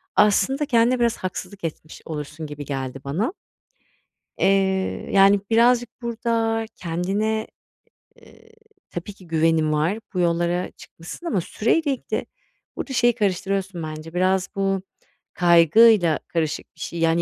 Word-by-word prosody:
aslında 265 +8 +3
kendine 245 -2 +3
biraz 235 -1 +2
haksızlık 185 +1 -6
etmiş 155 -1 -6
olursun 150 0 -6
gibi 145 0 -7
geldi 135 -1 -4
bana. 180 - -1 1.0
Eee, 190 -1 +1
yani 195 +1 +6
birazcık 240 +1 +4
burada 230 -1 -1
kendine, 200 +6 -1 0.8
eee, 455 - -19 0.4
tabii 175 +4 -6
ki 185 -2 -17
güvenin 160 -1 +2
var, 165 +9 0
bu 185 - -2
yollara 175 +1 0
çıkmışsın 175 - -11
ama 195 - +1
süreyle 280 - 0
ilgili. 260 - -4 0.5
Burada 265 - -4
şeyi 240 -1 +3
karıştırıyorsun 195 -2 -1
bence 155 +1 -7
biraz 185 +1 +1
bu 195 -1 0 0.5
kaygıyla 175 +1 +5
karışık 160 -3 -3
bir 165 - -23
şey, 170 +1 -5
yani 165 +1 +2
190 Hz, 125 wpm, -23 LUFS, 165-225 Hz, 1.0 s, yani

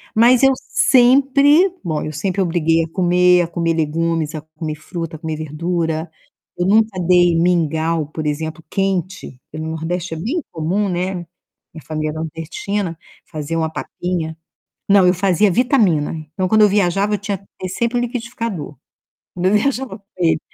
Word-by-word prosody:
Mas 240 +3 +5
eu 270 - +7
sempre, 280 +7 +4
bom, 160 -4 -2
eu 155 - -4
sempre 185 +5 -1
obriguei 165 -2 +2
a 160 - -6
comer, 180 0 +4
a - - -3
comer 170 -1 -1
legumes, 165 0 -1
a 155 - -5 0.2
comer 155 -2 -3
fruta, 165 +1 -6
a - - -23
comer 160 -1 -4
verdura. 160 +1 -2 0.5
Eu 175 - 0
nunca 215 -1 +3
dei 175 -1 +5
mingau, 165 -2 +1
por 155 0 -6
exemplo, 160 +2 -4
quente. 185 -7 -2
Porque 155 +1 -7
no 160 - -4
Nordeste 165 +2 -3
é - - -7
bem 260 - -2
comum, 180 +6 -1
né. 180 +1 -1 0.6
Minha 160 - -11
família 155 -1 -2
é - - -8
nordestina, 165 +3 -4 0.3
fazia 155 +1 -4
uma 160 -1 0
papinha. 165 -2 -4 0.5
Não, 195 -2 +6
eu 180 - +5
fazia 195 +2 +2
vitamina. 210 - +2 0.2
Então, 185 -1 0
quando 215 +1 +4
eu 210 - +7
viajava, 200 +1 +1
eu 205 - 0
tinha 200 0 -3
que 195 - -24
ter 185 - -4
sempre 235 +5 -1
um - - +1
liquidificador. 230 - -4 0.6
Quando 180 +1 -1
eu 190 - +3
viajava 255 -2 0
com 200 - -33
ele. 165 -2 +2
175 Hz, 170 wpm, -19 LUFS, 160-205 Hz, 0.6 s, eu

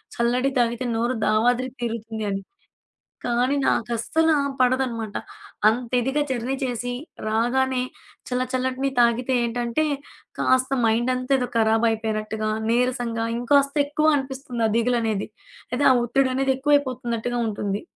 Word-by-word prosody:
చల్లటి 245 +3 +1
తాగితే 240 +1 0
నోరు 235 +2 0
దావాద్రి 245 +4 +2
తీరుతుంది 225 -2 -4
అని. 195 0 -2 0.8
కానీ 245 +3 +1
నాకు 230 - +1
అస్సలు 320 +8 +2 0.3
పడదనమాట. 250 -4 0 0.5
అంత 235 +2 +1
ఇదిగా 265 +5 0
జర్నీ 255 0 -2
చేసి 245 -1 -2 0.4
రాగానే 250 +4 +1 0.5
చల్ల 250 0 0
చల్లటిని 260 +1 0
తాగితే 240 +2 +3
ఏంటంటే 235 +4 -1 0.6
కాస్త 260 0 +2
మైండంతా 250 +4 +1
ఏదో 250 - -1
ఖరాబయిపోయినట్టుగా, 220 -1 +1 0.2
నీరసంగా 240 -1 0
ఇంకాస్త 280 +3 +2
ఎక్కువ 305 +2 +2
అనిపిస్తుంది 265 -3 -3
ఆ - - -1
దిగులనేది. 230 -3 0 0.4
లేతే 250 +3 +1
ఆ - - +6
ఒత్తిడనేది 265 +2 +1
ఎక్కువైపోతున్నట్టుగా 255 -4 0
ఉంటుంది. 205 -1 -2
245 Hz, 115 wpm, -24 LUFS, 230-260 Hz, 0.8 s, ఆ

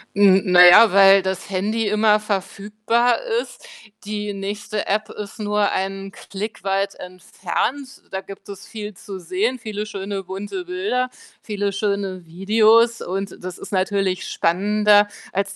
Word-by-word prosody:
Hm, 195 -1 +5
na 180 0 +9
ja, 215 +5 +8
weil 195 0 +7
das 190 0 -4
Handy 210 +4 -1
immer 210 +1 +3
verfügbar 210 +4 -1 0.2
ist. - - -13 0.4
Die 210 0 -4
nächste 205 +2 -5
App 210 +2 -1
ist 205 -1 -8
nur 210 -1 0
einen 195 +1 -3
Klick 205 +3 -8
weit 195 0 -1
entfernt. 205 +9 -5
Da 190 - -4
gibt 195 +1 -12
es 200 -1 -9
viel 210 -2 -8
zu 190 +1 -9
sehen, 200 +9 -2
viele 215 -2 -5
schöne, 195 -2 -5
bunte 205 - -6
Bilder, 360 -9 -2 0.3
viele 205 -2 -3
schöne 195 -2 -3
Videos. 220 +6 +3
Und 195 +1 -5
das 185 0 -6
ist - - -10
natürlich 190 -1 -1
spannender, 205 +4 +3 0.3
als 195 +1 -2
200 Hz, 145 wpm, -21 LUFS, 195-215 Hz, 0.4 s, na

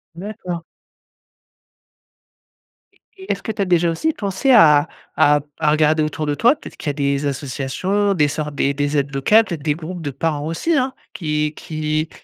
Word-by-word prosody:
D'accord. 180 -2 -6 2.3
Et - - -31 0.2
et 380 - -3
est-ce 195 - -3
que - - -2
tu 205 - -4
as - - +2
déjà 175 -2 +2
aussi 315 - -1
pensé 200 +5 0
à 150 - +6 0.3
à 145 0 +4 0.2
à 150 - +2
regarder 155 0 +3
autour 155 0 -3
de 145 -1 -1
toi? 240 - +4
Peut-être - - -12
qu'il 160 - -8
y - - +2
a - - -7
des 140 0 -1
associations, 145 +9 -1
des 150 -6 +3
sortes, 150 0 -4
des 140 0 +1
des 145 +1 -1
aides 140 0 -1
locales, 210 +12 +4
peut-être 170 -8 -5
des 150 -1 +1
groupes 170 +2 -7
de 145 -3 -4
parents 150 +1 -2
aussi 165 - -1
hein, 260 -1 +1 0.2
qui 150 -2 -1
qui 155 0 -3
155 Hz, 185 wpm, -20 LUFS, 145-190 Hz, 2.3 s, à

